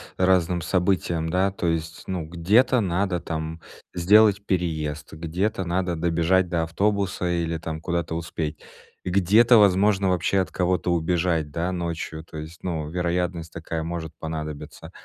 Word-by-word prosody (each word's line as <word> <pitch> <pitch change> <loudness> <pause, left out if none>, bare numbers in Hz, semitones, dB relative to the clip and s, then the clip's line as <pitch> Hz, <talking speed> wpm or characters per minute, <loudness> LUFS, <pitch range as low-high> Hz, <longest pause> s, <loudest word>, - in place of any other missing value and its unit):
разным 90 -2 +2
событиям, 90 -2 0
да. 95 +3 +2
То 95 -2 -3
есть, 80 0 -2
ну, 90 -3 -2
где-то 100 +11 +3
надо 95 -2 0
там 80 0 -5 0.3
сделать 100 +3 +5
переезд, 80 -5 -2
где-то 90 +6 -2
надо 90 0 -1
добежать 85 +2 +2
до 85 -2 0
автобуса 95 +1 0
или 85 -1 -1
там 80 0 -5
куда-то 85 -2 -2
успеть. 80 -2 -4 0.5
Где-то, 105 +6 +5
возможно, 100 -1 +4
вообще 90 +2 +1
от 95 - -1
кого-то 90 -1 0
убежать, 85 -2 0
да, 85 +4 -2
ночью, 85 -2 -4
то 80 0 -11
есть, 80 +2 -9
ну, 80 -4 -3
вероятность 90 -1 -2
такая 80 0 -4
может 80 -1 -5
понадобиться. 75 -2 -6
85 Hz, 140 wpm, -24 LUFS, 80-95 Hz, 0.5 s, сделать